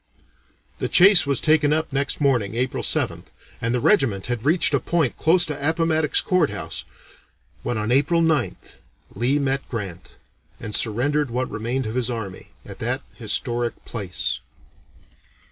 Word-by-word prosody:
The - - -2
chase 180 -3 +7
was 140 -3 +1
taken 155 -2 +3
up 155 -2 -1
next 140 0 -1
morning 125 -8 +1
(April 125 +1 -1
7th), - - -1 0.4
and 115 - 0
the - - +1
regiment 115 - +2
had 120 +1 -3
reached 165 +3 +3
a - - +3
point 165 -7 0
close 170 +2 +3
to 145 -1 -2
Appomattox 160 -2 +1
Court 185 -8 +2
House, 100 -1 -5 0.8
when 120 - -2
on 110 +2 -2
April 145 +6 +3
9th 160 -6 -1 0.3
Lee 130 +4 +1
met 140 -1 -1
Grant 100 -7 -6 0.5
and 105 - -7
surrendered 130 +7 +1
what 125 +2 -2
remained 120 +4 -2
of 110 - -4
his 125 -1 -1
army, 110 -6 -6 0.2
at - - -10
that - - -2
historic 120 0 -2
place. 100 -6 -3
130 Hz, 150 wpm, -23 LUFS, 115-155 Hz, 0.8 s, chase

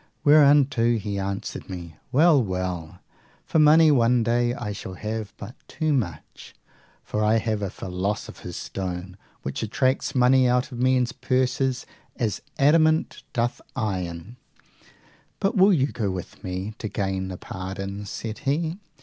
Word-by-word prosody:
Whereunto 140 -5 +5
he 100 -1 -3
answered 100 0 -4
me, 85 -4 -7 0.2
Well, 150 -1 +5
well; 90 -3 -4 0.4
for 160 - +1
money 155 +1 +7
one 120 -3 +3
day 120 +1 +2
I 105 -4 -4
shall 95 -2 -7
have 110 +1 -4
but 120 - -8
too 155 -1 -1
much, 85 - -4 0.5
for 105 - -2
I 105 +1 +4
have 110 -1 -1
a 100 - -2
philosopher's 95 +3 -4
stone 90 -1 -5 0.3
which 65 - -4
attracts 130 +6 0
money 125 0 +5
out 125 +3 +1
of 120 - -7
men's 130 -1 +2
purses 130 0 0 0.3
as 110 -4 -1 0.2
the 145 - -1
adamant 155 +2 +3
doth 120 0 -1
iron. 95 -2 -3 1.0
But 195 +4 0
will 195 +1 +6
you 145 -8 +3
go 105 -4 -2
with 95 -2 -7
me 95 +3 -4
to 110 - -3
gain 95 -2 -2
the 95 -1 -6
pardons? 95 +3 -6
said 110 -1 -5
he. 160 +6 -1
115 Hz, 145 wpm, -25 LUFS, 95-130 Hz, 1.0 s, money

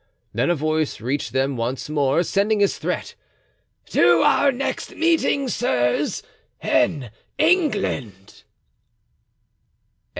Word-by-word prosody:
Then - - 0
a 175 - +2
voice 155 -2 -1
reached 130 +6 -3
them 135 +1 0
once 120 +3 -3
more, 145 +1 +1
sending 205 +4 +1
this 200 -1 +1
threat: - - -3 0.8
"To - - +4
our 280 - +4
next 270 +2 -4
meeting, 320 -4 +1
sirs, 125 - 0 0.4
in 125 -3 0 0.3
England." 210 - 0
155 Hz, 100 wpm, -22 LUFS, -, 0.8 s, To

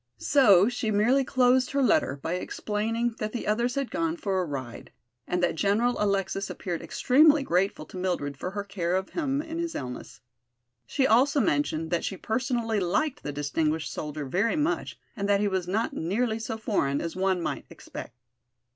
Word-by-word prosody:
So 205 -9 +5
she 245 -2 -2
merely 230 +6 +3
closed 255 0 +3
her 280 -1 +2
letter 145 - +2
by 165 - -1
explaining 225 - -2
that 215 0 -3
the 240 - -4
others 235 +4 0
had 275 -2 -2
gone 330 +3 -1
for 195 - -1
a - - -1
ride 130 -6 -6 0.4
and 180 0 -1
that - - +2
General 210 +7 +1
Alexis 195 -1 0
appeared 175 -4 -4
extremely 295 +2 +4
grateful 180 - 0
to 185 - -10
Mildred 175 -6 -2
for 180 - -4
her 200 +1 -4
care 185 -3 -2
of 190 0 -1
him 285 -3 -1
in 325 +1 -5
his 335 -1 -3
illness. 125 -3 -6 0.7
She 265 - +1
also 265 +5 +4
mentioned 160 - 0
that 170 - 0
she 195 - -3
personally 230 -1 -1
liked 255 - 0
the 145 - -4
distinguished 150 +2 -1
soldier 150 -1 -5
very 195 - +1
much 310 +3 -1 0.2
and 200 -2 -2
that 200 -1 +4
he 205 - +1
was 190 -3 -1
not 215 +5 -1
nearly 220 +7 -1
so 225 0 -4
foreign 145 -11 0
as 165 - -4
one 190 -1 +1
might 170 - -4
expect. 120 - -9
205 Hz, 180 wpm, -27 LUFS, 175-250 Hz, 0.7 s, So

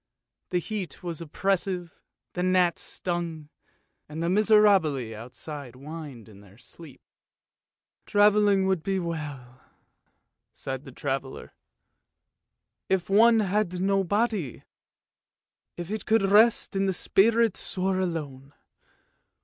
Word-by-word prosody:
The 180 - 0
heat 190 0 -5
was 170 -2 -5
oppressive, 180 +1 -2 0.4
the 180 - -3
gnats 180 -2 +2
stung, 170 -4 -4 0.6
and 155 +2 -5
the 170 - 0
miserabili 195 - +3
outside 125 +4 -9
whined 140 -4 -9
in 100 -2 -15
their 100 0 -18
sleep. 145 +3 -13 0.5
" - - -60
Travelling 205 -1 +4
would 190 -3 +1
be 195 +3 -1
well 170 -2 -2 0.2
enough," 125 0 -18 0.9
sighed 135 0 -6
the 135 - -10
traveller, 135 0 -5 0.7
" - - -59
if 180 - -13
one 225 +2 +6
had 195 -2 -1
no 195 +1 +2
body. 205 - -1 1.1
If 175 +2 -6
it 215 - -4
could 225 -1 +3
rest 210 +2 +4
and 195 0 +1
the - - 0
spirit 225 +3 +3
soar 190 0 -1
alone. 145 -6 -4
180 Hz, 120 wpm, -26 LUFS, 145-195 Hz, 1.1 s, one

